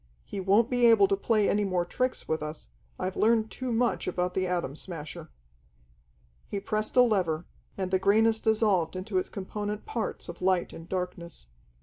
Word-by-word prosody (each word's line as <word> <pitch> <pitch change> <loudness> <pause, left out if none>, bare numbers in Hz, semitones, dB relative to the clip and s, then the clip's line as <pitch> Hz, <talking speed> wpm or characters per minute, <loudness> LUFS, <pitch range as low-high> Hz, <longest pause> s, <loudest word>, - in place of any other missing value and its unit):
He 200 - -5
won't 200 +4 +4
be 245 -1 +4
able 220 -4 +6
to 200 - +3
play 210 +1 +2
any 210 +1 +2
more 185 -3 0
tricks 255 +8 -2
with 160 -1 -1
us. 150 - -5 0.3
I've 185 0 -3
learned 220 0 +2
too 255 -1 -4
much 235 +1 +1
about 180 0 -1
the 185 -1 0
Atom 175 -6 -2
Smasher." 160 -3 -8 1.2
He 200 - -3
pressed 215 +4 -2
a 250 - +9
lever, 180 -8 +1 0.3
and 190 -1 -2
the 190 - +3
greyness 220 +3 +4
dissolved 210 -7 +2
into 185 +1 -1
its - - -4
component 205 +2 -5
parts 230 - -4
of 170 +1 -9
light 185 -1 +1
and 165 +1 -10
darkness. 180 - -4
195 Hz, 180 wpm, -28 LUFS, 180-220 Hz, 1.2 s, a